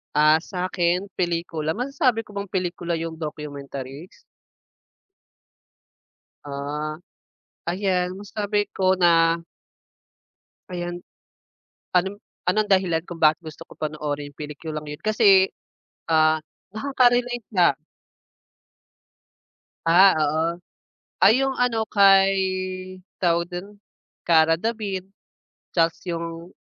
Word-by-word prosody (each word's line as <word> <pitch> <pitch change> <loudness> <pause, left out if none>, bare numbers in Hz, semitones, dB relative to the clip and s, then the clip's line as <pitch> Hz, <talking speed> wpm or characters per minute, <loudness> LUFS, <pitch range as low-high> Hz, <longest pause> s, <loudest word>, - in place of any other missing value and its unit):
Ah, 155 +1 +5
sa'kin 180 +1 -1
pelikula, 165 -3 -1
masasabi 255 -2 0
ko 215 - -19
bang 200 - -4
pelikula 175 -2 -2
yung 165 0 -4
documentaries? 145 -2 -7 2.4
Ah, 145 +2 -4 0.7
ayan 180 0 0
masasabi 205 0 -2
ko 190 0 +2
na 165 -2 +3 1.3
Ayan. 175 0 -4 0.9
Anong 190 +3 +1 0.2
anong 210 +4 +1
dahilan 185 -4 +2
kung 175 - -6
bakit 155 0 +4
gusto 155 -2 -10
kong - - -18
panoorin 150 -1 -3
yung 145 - -27
pelikulang 150 +1 -6
yun? 150 0 -8
Kasi, 205 -3 +5 0.6
ah, 155 0 +4 0.3
nakaka-relate 245 -1 +1
na 170 -6 +5 2.1
Ah, 180 +2 +6
oo. 155 +2 0 0.6
Ay 250 +5 +6
yung 270 -1 -1
ano 230 -3 +1
kay, 195 -1 +5 0.8
tawag 170 -1 +1
dun, 195 +4 -7 0.5
Kara 165 -1 +4
David 200 -2 -3 0.7
tas 165 -1 +3
yung 170 +1 -5
175 Hz, 95 wpm, -23 LUFS, 160-200 Hz, 2.4 s, Ah